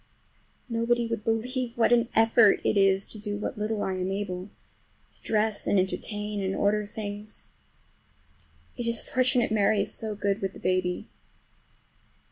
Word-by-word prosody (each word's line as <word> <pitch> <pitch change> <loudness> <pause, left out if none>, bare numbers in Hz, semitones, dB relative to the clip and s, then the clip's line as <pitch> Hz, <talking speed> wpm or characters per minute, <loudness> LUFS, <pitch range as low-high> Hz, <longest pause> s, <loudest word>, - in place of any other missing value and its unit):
Nobody 235 0 +1
would 230 -2 -3
believe 240 +2 -2
what 235 +1 +4
an 235 0 +3
effort 225 -2 +5
it - - +1
is 195 -1 +3
to 215 - -8
do 205 -1 -3
what 205 - -4
little 210 0 -1
I 190 - -1
am 185 0 -2
able—to 195 0 -8
dress 215 -1 0
and 205 - +3
entertain, 210 +2 -2
and 190 0 -1
order 210 +1 +1
things. 210 0 -6 1.3
It 240 -2 -3
is 230 -1 +2
fortunate 255 -3 +2
Mary 210 -1 +3
is 205 - -3
so 215 -1 -4
good 200 0 -1
with 195 -1 -2
the - - -11
baby. 185 -1 0
210 Hz, 150 wpm, -27 LUFS, 200-230 Hz, 1.3 s, effort